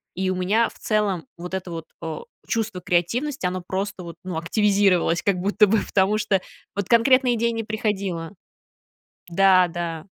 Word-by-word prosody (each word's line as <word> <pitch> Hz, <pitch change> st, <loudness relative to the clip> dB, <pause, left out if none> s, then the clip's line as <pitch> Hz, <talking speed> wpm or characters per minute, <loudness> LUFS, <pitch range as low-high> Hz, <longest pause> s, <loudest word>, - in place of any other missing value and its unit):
И 190 Hz, +1 st, -1 dB
у -, -, -1 dB
меня 205 Hz, +6 st, +2 dB
в -, -, -19 dB
целом 205 Hz, -6 st, 0 dB
вот 180 Hz, +2 st, -8 dB
это 190 Hz, -1 st, -3 dB
вот, 165 Hz, -1 st, -6 dB, 0.2 s
э, 160 Hz, -1 st, -4 dB, 0.3 s
чувство 225 Hz, -5 st, -2 dB
креативности, 200 Hz, -, 0 dB
оно 180 Hz, 0 st, -1 dB
просто 190 Hz, +1 st, -4 dB
вот, 170 Hz, -1 st, -8 dB
ну, 180 Hz, -3 st, -4 dB
активизировалось 195 Hz, -1 st, +2 dB
как 200 Hz, -, +1 dB
будто 205 Hz, +3 st, +3 dB
бы, 220 Hz, +3 st, +3 dB
потому 200 Hz, +2 st, +2 dB
что 200 Hz, -2 st, +1 dB, 0.4 s
вот 200 Hz, -2 st, -1 dB
конкретные 250 Hz, +1 st, +4 dB
идеи 235 Hz, +1 st, +1 dB
не 225 Hz, -1 st, -3 dB
приходило. 200 Hz, -6 st, -2 dB, 1.0 s
Да, 185 Hz, 0 st, +5 dB
да. 165 Hz, -2 st, -5 dB
190 Hz, 165 wpm, -23 LUFS, 175-215 Hz, 1.0 s, Да